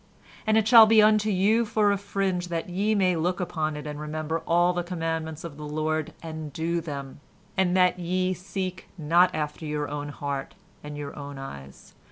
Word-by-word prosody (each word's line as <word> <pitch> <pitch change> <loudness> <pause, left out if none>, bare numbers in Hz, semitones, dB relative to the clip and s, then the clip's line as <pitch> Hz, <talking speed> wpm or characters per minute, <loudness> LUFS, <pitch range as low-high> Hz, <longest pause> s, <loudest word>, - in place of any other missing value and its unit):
"And 220 0 +4
it 220 -1 +2
shall 225 -1 +9
be 220 0 +6
unto 215 0 +5
you 210 +4 +3
for 210 -2 +2
a 200 - +1
fringe, 195 -3 -1
that 170 -1 -3
ye 205 +4 +1
may 185 -3 +3
look 175 +3 -1
upon 155 -4 -2
it 150 - -7
and 150 0 -5
remember 155 +1 -3
all 175 +1 +3
the 175 - -1
commandments 165 -2 -3
of 160 -4 -8
the 150 0 -7
Lord, 155 +1 -1
and 160 -2 -6
do 165 +3 -1
them, 140 -4 -7 0.4
and 190 -1 +2
that 180 0 +3
ye 185 +1 0
seek 185 0 -5
not 170 +3 +4
after 150 +1 -3
your 150 -1 -2
own 145 0 -5
heart 140 -1 -5 0.3
and 150 0 -7
your 145 -1 -6
own 145 -1 -8
eyes. 70 - -10
170 Hz, 195 wpm, -26 LUFS, 150-185 Hz, 0.4 s, shall